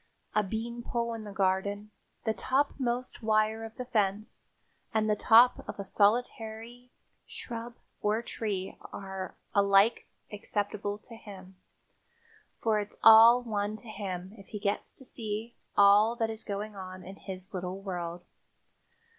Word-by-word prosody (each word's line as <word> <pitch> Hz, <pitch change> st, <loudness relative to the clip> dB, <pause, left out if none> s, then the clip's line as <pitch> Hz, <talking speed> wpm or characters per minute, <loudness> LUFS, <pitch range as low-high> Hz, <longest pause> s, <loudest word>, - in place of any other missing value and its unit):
A 215 Hz, -, +4 dB
beanpole 235 Hz, +3 st, -3 dB
in 225 Hz, -1 st, -6 dB
the 205 Hz, -, -7 dB
garden, 200 Hz, +2 st, 0 dB, 0.3 s
the 220 Hz, -, +2 dB
topmost 255 Hz, +1 st, -1 dB
wire 220 Hz, 0 st, +2 dB
of 225 Hz, 0 st, -8 dB
the 250 Hz, -, -5 dB
fence 210 Hz, -2 st, -1 dB, 0.5 s
and 215 Hz, 0 st, +2 dB
the 210 Hz, -, +3 dB
top 235 Hz, +4 st, +6 dB
of -, -, -5 dB
a -, -, -2 dB
solitary 225 Hz, +3 st, 0 dB, 0.4 s
shrub 235 Hz, 0 st, -7 dB, 0.3 s
or 215 Hz, +3 st, +1 dB
tree 200 Hz, -5 st, -4 dB, 0.2 s
are 190 Hz, -1 st, -6 dB, 0.2 s
alike 200 Hz, +1 st, +4 dB, 0.2 s
acceptable 205 Hz, -1 st, -3 dB
to 230 Hz, +2 st, -13 dB
him, 195 Hz, -4 st, -12 dB, 1.1 s
for 220 Hz, -2 st, +3 dB
it's 205 Hz, 0 st, -6 dB
all 225 Hz, +2 st, +9 dB
one 210 Hz, -2 st, -2 dB
to 230 Hz, -, -13 dB
him 190 Hz, -3 st, -5 dB
if 195 Hz, -, -14 dB
he 210 Hz, -, -6 dB
gets 200 Hz, 0 st, -2 dB
to 265 Hz, -, -10 dB
see 220 Hz, -1 st, -5 dB, 0.2 s
all 205 Hz, +3 st, +6 dB
that 225 Hz, -2 st, -1 dB
is 220 Hz, 0 st, -7 dB
going 205 Hz, +1 st, -5 dB
on 185 Hz, -1 st, -8 dB
in 190 Hz, +2 st, -10 dB
his 190 Hz, -1 st, -8 dB
little 185 Hz, +1 st, -4 dB
world. 175 Hz, -3 st, -5 dB
210 Hz, 140 wpm, -30 LUFS, 195-225 Hz, 1.1 s, all